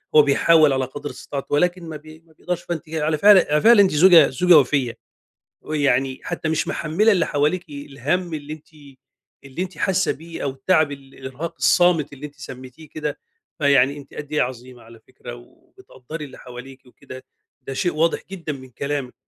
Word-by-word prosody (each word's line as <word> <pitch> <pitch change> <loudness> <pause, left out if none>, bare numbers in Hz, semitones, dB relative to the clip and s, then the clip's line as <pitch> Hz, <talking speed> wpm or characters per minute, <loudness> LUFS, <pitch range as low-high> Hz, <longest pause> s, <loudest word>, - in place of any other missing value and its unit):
هو 150 - +9
بيحاول 150 +1 +4
على 130 0 0
قدْر 145 +3 -8
استطاعته، 140 0 -7
ولكن 180 +4 +1
ما 155 - -6
بي 155 +1 -15
ما 160 - -24
بيقدرش. 180 +2 -5
فأنتِ 160 -3 -5
ي 160 0 -4
على 155 +1 0
فعل 205 +3 +7
على 150 0 +2
فعل، 235 -1 +6
أنتِ 195 -2 +5
زوجة 165 -1 +6
زوجة 175 +6 +5
وفيّة، 130 -3 -1 0.7
ويعني 135 -3 0
حتى 155 - -4
مش 160 - -1
محملة 200 +8 +1
اللي 175 -4 +1
حواليكِ 155 +5 -1
الهَم 145 +4 -3
اللي 150 0 -7
أنتِ 155 -1 -11 0.8
اللي 135 +6 -5
أنتِ 185 -3 -7
حاسة 190 0 +1
بيه 165 +2 -9
أو 140 - -1
التعب، 145 +3 +1
الإرهاق 135 +2 -8
الصامت 175 -5 +3
اللي 140 +1 -8
أنتِ 145 - -16
سميتِيه 130 +3 -11
كده. 150 0 -5 0.4
فيعني 140 -1 +3
أنتِ 140 -1 -14
قد 150 0 -8
إيه 150 - +2
عظيمة 125 0 -7
على 115 0 -16
فكرة، 120 0 -11
وبتقدّري 150 - -12
اللي 135 - -12
حواليكِ 130 +1 -12
وكده، 130 0 -13 0.4
ده 135 - -7
شيء 175 +5 -1
واضح 160 +2 +1
جدًا 170 -5 -5
من 130 -2 -11
كلامِك. 140 -1 -4
145 Hz, 180 wpm, -21 LUFS, 135-165 Hz, 0.8 s, هو